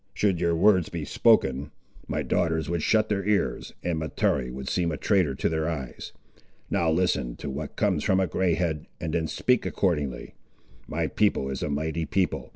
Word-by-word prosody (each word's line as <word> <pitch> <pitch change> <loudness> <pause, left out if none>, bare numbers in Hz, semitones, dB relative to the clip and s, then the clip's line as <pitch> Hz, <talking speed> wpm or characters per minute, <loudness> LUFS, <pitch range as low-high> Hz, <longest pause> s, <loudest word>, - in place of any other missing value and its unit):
Should 95 -5 +1
your 85 -1 +2
words 90 -1 +4
be 85 -4 -4
spoken, 70 -1 +3 0.4
my - - -1
daughters 80 -2 0
would 85 -2 0
shut 110 +4 +3
their 100 -2 -1
ears, 105 0 -1
and 85 -2 -1
Mahtoree 70 -4 0
would 65 +1 -7
seem 85 -2 0
a 75 - -3
trader 90 -10 +2
to - - 0
their 80 0 0
eyes. 70 -7 -6 0.6
Now 85 - +2
listen 80 -8 +1
to - - -6
what 75 +3 -6
comes 95 -8 +1
from 95 - +3
a 95 - +3
grey 90 0 +1
head, 80 -3 -2
and 80 - -3
then 80 -2 0
speak 125 +8 +1
accordingly. 75 -10 -1 0.5
My - - -1
people 70 0 +1
is 65 - -4
a - - -1
mighty 80 +2 -2
people. 95 -1 -1
80 Hz, 185 wpm, -26 LUFS, 75-90 Hz, 0.6 s, words